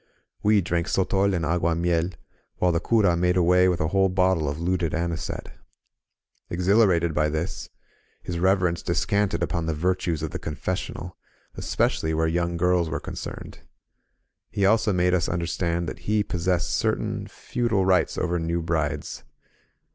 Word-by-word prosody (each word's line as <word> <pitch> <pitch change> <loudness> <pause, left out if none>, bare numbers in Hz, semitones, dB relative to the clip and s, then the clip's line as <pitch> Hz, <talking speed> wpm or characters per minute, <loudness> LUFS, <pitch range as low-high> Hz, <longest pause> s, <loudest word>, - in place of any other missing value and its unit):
We 105 -1 +4
drank 85 -1 -1
sotol 95 +1 +1
and 85 -2 -1
agtuimiel, 85 +1 0 0.4
while 90 -1 +1
ihe 85 - +1
cura 105 -6 +3
made 90 +1 +1
away 90 +1 +4
with 90 - 0
a 80 - 0
whole 95 +1 +3
bottle 90 -5 +2
of 70 +2 -4
looted 85 -1 0
anisette. 85 0 -3 1.0
Exhilarated 90 -2 +3
by 75 0 +1
this. 80 +4 -4 0.5
His 85 -1 -4
Reverence 90 -2 +2
descanted 100 -4 0
upon 85 -1 -2
the 80 - -1
virtues 90 -1 -1
of 80 - -3
the - - -4
confessional, 90 +3 -4 0.4
especially 80 0 0
where 80 +1 +1
young 85 +1 0
girls 90 -1 +2
were - - -2
concerned. - - -7 0.9
He 100 - 0
also 110 +1 +3
made 90 -1 +2
us 90 -2 +1
understand 85 0 -1
that - - -6
he 105 0 0
possessed 90 -2 -1
certain - - -1
feudal 115 -6 -1
rights 95 -1 +2
over 90 -1 0
new 85 +1 -1
brides. 80 -3 -2
85 Hz, 145 wpm, -25 LUFS, 85-95 Hz, 1.0 s, We